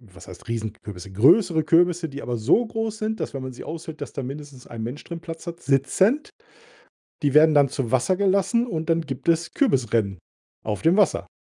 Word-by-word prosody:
was 95 -7 -16
heißt 90 +5 -12
Riesenkürbisse? 105 -4 -6
Größere 160 - +4
Kürbisse, 170 +1 +3
die 140 +1 -8
aber 120 -1 -3
so 150 - +3
groß 225 -1 -3
sind, 220 0 -3
dass, - - -4
wenn 135 - -4
man 130 0 -6
sie - - -10
aushöhlt, 160 -1 -8
dass - - -6
da 135 - -5
mindestens 140 -1 -9
ein 115 -1 -7
Mensch 120 +6 -6
drin 170 -1 -7
Platz 165 0 -9
hat, 170 0 -7
sitzend! 185 - +1 0.9
Die 145 -1 +1
werden 155 0 +7
dann 140 -2 +5
zu 135 -4 -3
Wasser 130 +8 +2
gelassen 200 +4 +2
und 160 -7 -4
dann 165 0 +2
gibt 140 +2 -4
es 170 +1 +1
Kürbis-Rennen 115 - +1 0.5
auf 105 -1 -3
dem 170 +5 +3
Wasser. 205 - +2
150 Hz, 200 wpm, -23 LUFS, 125-175 Hz, 0.9 s, werden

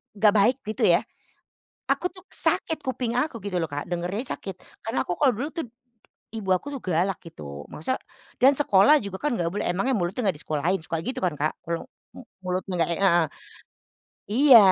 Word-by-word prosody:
nggak 210 0 +5
baik 220 +5 +4
gitu 215 - -2
ya. - - +5 0.9
Aku 360 - +2
tuh 370 - -14
sakit 320 -2 +1
kuping 250 -2 -2
aku 265 -3 -1
gitu 200 -3 -2
loh 165 - -1
Kak, 145 +1 -4
dengernya 180 +8 -2
sakit. 195 -2 -7 0.3
Karena 225 +2 0
aku 175 - -1
kalau 265 -4 +4
dulu 280 +6 -2
tuh, 330 -3 -3 0.7
ibu 215 -4 -5
aku 230 - -7
tuh 260 - -9
galak 180 +1 +1
gitu. 75 - -9
Masa 210 +12 -2 0.5
dan 270 +2 +8
sekolah 255 +1 +6
juga 200 -1 -5
kan 295 - +1
nggak 170 -4 0
boleh, 205 - -2
emang 180 +6 -1
ya - - +2
mulutnya 195 +5 -1
nggak 185 - 0
di - - -4
sekolahin 160 +5 0
suka 165 - -2
gitu 255 - -3
kan 175 -4 +1
Kak, 155 +2 +1
kalo, 170 0 -2 0.3
mu - - -9 0.2
mulutnya 185 +1 -2
nggak 165 - +2
heeh. 175 -4 +4 1.1
Iya, 260 +1 +9
195 Hz, 190 wpm, -25 LUFS, 175-250 Hz, 1.1 s, Iya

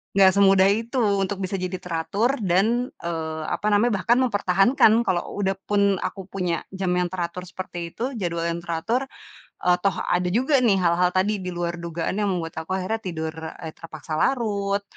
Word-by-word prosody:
gak 195 -1 +7
semudah 195 0 +5
itu 225 +4 -2 0.3
untuk 195 +1 -2
bisa 190 +1 -2
jadi 185 +1 -3
teratur, 195 +10 -1
dan, 225 +8 +2 0.2
eee, 160 -2 -3
apa 210 - -2
namanya 210 +4 +3
bahkan 235 +5 +3
mempertahankan, 205 +2 +4
kalau 180 -4 +1 0.2
udah 195 0 +2
pun 205 -1 +2 0.3
aku 195 - -8
punya 180 -4 -1
jam 190 -1 -2
yang 180 -1 0
teratur 180 -1 -4
seperti 175 -2 -6
itu 255 +7 -4
jadwal 170 -5 -2
yang 170 0 -3
teratur, 175 +10 -1 0.6
eee, 180 0 +4
toh 195 0 +1
ada 180 0 0
juga 265 +5 +3
nih 235 -5 +4
hal-hal 180 +1 +2
tadi 205 +3 +1
di 180 -2 -5
luar 175 0 -3
dugaan 170 +3 -3
yang 210 - +1
membuat 165 -2 -4
aku 160 +3 -3
akhirnya 190 +4 -1
tidur, 165 -6 -4
eee, 160 0 -7
terpaksa 155 -1 -7
larut, 200 -5 0
185 Hz, 175 wpm, -24 LUFS, 170-205 Hz, 0.6 s, gak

